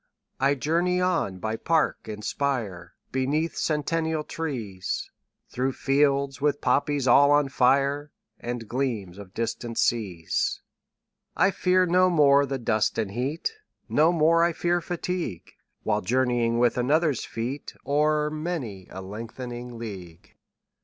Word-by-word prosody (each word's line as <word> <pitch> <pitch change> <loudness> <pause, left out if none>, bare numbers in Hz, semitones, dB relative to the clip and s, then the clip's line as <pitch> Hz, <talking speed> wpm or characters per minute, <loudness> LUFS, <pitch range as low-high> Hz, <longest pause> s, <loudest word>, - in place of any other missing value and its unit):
20 135 +1 +3
I - - +2
journey 170 +6 +1
on 170 - 0
by 110 +4 -3
park 160 +6 0
and 105 -1 -6
spire, 110 -12 -2 0.2
Beneath 145 +5 0
centennial 160 +1 -1
trees, 115 - -4 0.4
Through 130 +2 -1
fields 140 0 +1
with 145 -1 +1
poppies 145 -2 +1
all 140 +3 +6
on 145 -1 +4
fire, 140 +3 +2 0.3
And 120 -2 -5
gleams 110 -7 -2
of 95 -2 -12
distant 115 0 -3
seas. 95 -8 0 0.7
I 195 - +4
fear 185 0 +3
no 180 +1 +4
more 140 -4 +5
the 135 0 -2
dust 110 -3 0
and 110 -4 -1
heat, 135 - -2 0.4
25 - - -17
No 155 +3 +5
more 165 0 +4
I 170 0 +2
fear 175 +1 0
fatigue, 175 - -4 0.3
While 105 -1 +1
journeying 120 +1 +1
with 120 +1 +2
another's 145 +1 +2
feet 125 +5 -5
O'er 150 +1 +2
many 150 - -4
a 95 +1 -8
lengthening 120 +4 -7
league. 95 -7 -9
135 Hz, 135 wpm, -26 LUFS, 115-155 Hz, 0.7 s, all